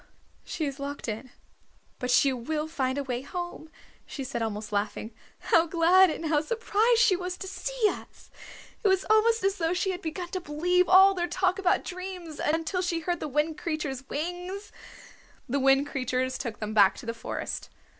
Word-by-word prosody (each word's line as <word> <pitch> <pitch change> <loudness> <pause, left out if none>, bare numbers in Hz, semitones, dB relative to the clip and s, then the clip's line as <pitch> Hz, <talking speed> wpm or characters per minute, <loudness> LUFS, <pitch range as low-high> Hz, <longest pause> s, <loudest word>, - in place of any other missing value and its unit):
"She 315 - -3
is 280 -1 -5
locked 280 -1 -5
in, 225 +4 -5 0.7
but 250 - -3
she 265 +2 +4
will 300 +5 -3
find 265 -4 -1
a 285 - -1
way 250 -2 -3
home," 350 +1 -6 0.4
she 275 - -5
said, 255 -2 -4
almost 215 -1 -3
laughing. 205 +2 -2 0.4
"How 335 +1 +5
glad 350 +3 +5
and 325 - -4
how 305 -2 +2
surprised 455 +4 +2
she 405 -6 +5
was 360 0 -4
to - - -7
see - - -2
us! - - -7 0.5
It - - +4
was 380 -1 +2
almost 450 +1 +4
as 390 0 +1
though 330 +1 +1
she 380 +1 0
had 365 0 -5
begun 345 +1 -4
to 370 0 -4
believe 355 +4 +1
all 385 +1 +8
their 350 -2 -1
talk 370 +1 0
about 370 -2 +2
dreams, 365 -3 -7
until 325 +4 0
she 345 -2 -1
heard 345 +1 -1
the - - -3
Wind 300 +3 0
Creatures' 285 -5 -4
wings!" 355 +6 -4 0.8
The 280 +3 0
Wind 270 +1 +4
Creatures 260 -1 -2
took 225 -4 -4
them 215 0 -4
back 200 -3 +5
to - - -9
the 230 - -2
forest. 230 - -5
325 Hz, 185 wpm, -27 LUFS, 270-365 Hz, 0.8 s, all